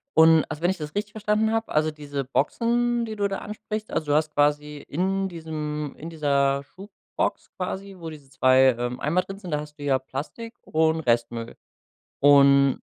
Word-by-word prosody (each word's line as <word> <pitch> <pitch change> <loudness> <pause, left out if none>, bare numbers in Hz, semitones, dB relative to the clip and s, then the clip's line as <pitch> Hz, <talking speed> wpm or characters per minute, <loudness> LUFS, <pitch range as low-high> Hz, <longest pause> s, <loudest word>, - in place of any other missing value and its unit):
und, 160 0 +7
also, 150 - -6
wenn 175 - +2
ich 190 - -1
das 150 +1 -7
richtig 210 0 -2
verstanden 215 +1 +1
habe, 225 0 -1
also, 155 +1 +2
diese 145 -2 -5
Boxen, 235 - 0
die 220 -1 -6
du 200 -1 0
da 195 - -4
ansprichst, 215 0 -6
also, 155 - -2
du - - +3
hast 155 0 +1
quasi 150 0 +1
in 190 +4 -1
diesem 150 -3 -5
in 165 - -7
dieser 140 -3 +1
Schubbox 195 +7 -5
quasi, 190 +1 -5
wo 165 -2 -7
diese 145 -4 -12
2, 130 -1 +4
ähm, 120 +1 -3
Eimer 170 +5 +1
drin 195 +1 -9
sind, 180 -5 -8
da 150 - 0
hast 150 0 -9
du - - -7
ja 135 -2 +2
Plastik 155 - -7
und 160 0 +1
Restmüll 115 -2 -1 0.6
und 140 -1 +6
155 Hz, 185 wpm, -25 LUFS, 140-195 Hz, 0.6 s, und